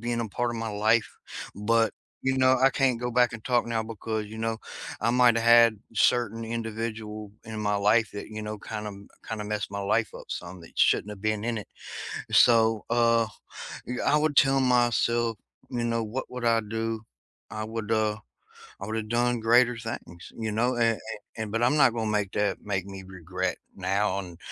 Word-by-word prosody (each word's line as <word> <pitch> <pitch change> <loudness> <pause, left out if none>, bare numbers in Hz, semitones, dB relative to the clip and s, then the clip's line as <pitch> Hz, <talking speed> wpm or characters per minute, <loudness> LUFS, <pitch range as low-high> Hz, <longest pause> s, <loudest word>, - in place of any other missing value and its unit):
being 120 0 -2
a 115 - -3
part 120 +4 -1
of 120 - -4
my 115 0 -3
life. 110 +2 +1 0.4
But, 115 +1 +2 0.3
you 130 0 +1
know, 130 0 +4
I 135 - +7
can't 130 -4 +1
go 125 0 -2
back 120 0 +3
and 115 -2 -8
talk 120 -2 +2
now 115 -1 -1
because, 110 -1 -4
you 110 +1 -9
know, 115 0 -1 0.4
I - - +1
might 125 -1 +5
had 115 -2 +6
certain 115 0 +2
individual 110 -2 -5
in 110 0 -6
my 105 -1 +1
life 105 +2 +3
that, 100 - -7
you 110 0 -6
know, 105 0 -5
kinda 105 +1 -5
m 100 0 -11 0.2
kinda 110 -2 -4
messed 105 -1 -3
my 100 - -4
life 110 +3 +1
up - - -10
some 90 +1 -6
that 85 - -13
shouldn't - - +3
have 100 -2 -9
been 110 -1 0
in 120 0 -1
it. 105 - -9 0.6
So, 115 -2 +5
uh, 115 -1 +3 0.6
y 125 - -3
I 150 - +4
would 150 -1 +1
tell 135 -1 +5
myself, 120 -2 +2 0.3
you 120 -2 -2
know, 115 -1 0
what 120 +5 -5
would 125 -1 -5
I 115 -1 +4
do? 115 +1 -3 0.5
I 110 0 -4
would, 110 0 -5
uh, 110 -1 +1 0.6
I 100 - -5
would've 110 0 -3
done 120 0 +1
greater 120 +2 +4
things, 110 -7 -7
you 110 -1 -3
know, 120 +4 +1
a 115 -1 +4
a - - -9 0.4
and 110 -2 -4
but 115 +1 0
I'm 125 +5 +3
not 135 -5 +5
gonna 110 -2 -1
make 105 -2 0
that 105 0 0
make 95 -2 -2
me 95 -1 -8
regret 90 0 -3 0.2
now 100 0 0
and 90 -3 -10
115 Hz, 200 wpm, -27 LUFS, 105-120 Hz, 0.6 s, I